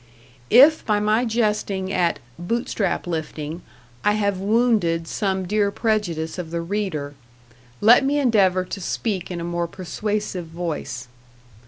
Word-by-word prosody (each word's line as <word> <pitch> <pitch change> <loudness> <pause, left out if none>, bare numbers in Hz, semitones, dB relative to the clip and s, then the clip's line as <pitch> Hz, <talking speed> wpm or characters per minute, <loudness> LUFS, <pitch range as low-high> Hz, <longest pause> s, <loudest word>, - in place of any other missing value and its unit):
If 285 +6 +7
by 210 -1 +1
my 215 +3 +2
jesting 210 -4 -1
at 175 -2 +1 0.2
"Bootstrap 220 +2 -1
lifting" 160 -1 -4 0.4
I 210 - +3
have 200 -3 0
wounded 200 -6 +2
some 190 -2 -1
dear 205 +2 +1
prejudice 195 -7 -1
of 170 -3 -5
the 170 +1 -3
reader, 170 -6 -3 0.7
let 235 +5 +7
me 280 +2 +1
endeavor 195 -9 +3
to 195 - -6
speak 190 0 -2
in 175 -2 -4
a - - -4
more 170 0 -2
persuasive 190 0 -3
voice. 160 -7 -5
195 Hz, 135 wpm, -22 LUFS, 170-215 Hz, 0.7 s, If